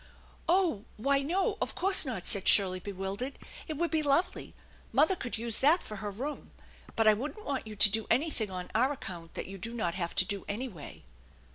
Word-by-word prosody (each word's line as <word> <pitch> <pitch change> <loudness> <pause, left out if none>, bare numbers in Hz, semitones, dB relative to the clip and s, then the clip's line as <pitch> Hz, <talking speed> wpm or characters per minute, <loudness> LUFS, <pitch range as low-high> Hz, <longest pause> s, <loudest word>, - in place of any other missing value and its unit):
" - - -27
Oh, 345 - +2
why, 275 +5 +2
no, 380 - -1
of - - -2
course 380 -2 +4
not," 225 -8 -4
said 200 -1 +2
Shirley, 185 -2 +5
bewildered. 200 +7 -5 0.3
"It 310 -3 -4
would 340 +2 -1
be 320 -1 +2
lovely. 305 +6 0 0.4
Mother 345 +5 +3
could 245 -8 -5
use 230 0 +1
that 310 +6 +4
for 215 - -8
her 205 +1 -4
room, 265 +9 -6 0.5
but 225 -1 +2
I 215 - +8
wouldn't 295 - -6
want 270 -5 -3
you 215 - -8
to 205 0 +8
do 220 +1 0
anything 255 -7 0
on 180 -1 -7
our 255 +5 +2
account 170 - -8
that - - -4
you 195 0 -9
do 230 +6 -4
not 175 -7 -1
have 170 -2 -4
to 185 - +6
do 200 0 -2
anyway." 205 - -7
230 Hz, 210 wpm, -30 LUFS, 200-295 Hz, 0.5 s, I